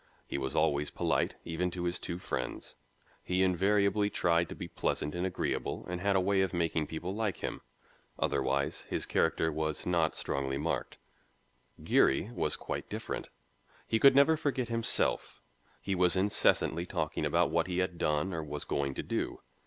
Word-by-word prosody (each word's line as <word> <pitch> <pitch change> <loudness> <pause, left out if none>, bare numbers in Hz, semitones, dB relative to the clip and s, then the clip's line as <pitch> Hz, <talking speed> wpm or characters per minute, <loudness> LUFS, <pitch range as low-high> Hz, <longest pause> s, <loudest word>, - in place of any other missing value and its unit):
He - - -3
was 65 +1 -3
always 75 -2 +2
polite, - - 0
even 85 +2 -1
to 90 0 -5
his 85 0 -1
two 85 - -4
friends. 90 - -4 0.5
He 90 +1 +1
invariably 100 +2 +2
tried 85 -3 +1
to - - -6
be - - -6
pleasant 75 - -2
and 90 +1 -1
agreeable 90 - -3
and 90 0 -4
had 100 0 +2
a - - +5
way 95 +1 +2
of 95 -1 0
making 80 -2 0
people 85 +5 -4
like 105 -3 -1
him. - - -3 0.6
Otherwise, 70 +1 0
his - - -1
character 80 0 +1
was 80 0 -2
not 85 -3 +1
strongly 70 0 -2
marked. 80 +3 -2 0.9
Geary 90 - +3
was - - 0
quite - - -5
different. - - -5 0.6
He 110 - +1
never 140 +4 +7
could 155 - -2
forget 130 -4 -1
himself. 115 -1 +2 0.4
He 95 - -2
was 90 -1 +3
incessantly 95 -3 +2
talking - - -2
about - - +2
what 85 +1 +1
he 90 -1 -2
had 95 -2 -1
done 75 +5 0
or 80 -1 -3
was 75 -1 -5
going 70 -1 -1
to - - -3
do. - - -3
90 Hz, 170 wpm, -31 LUFS, 80-95 Hz, 0.9 s, never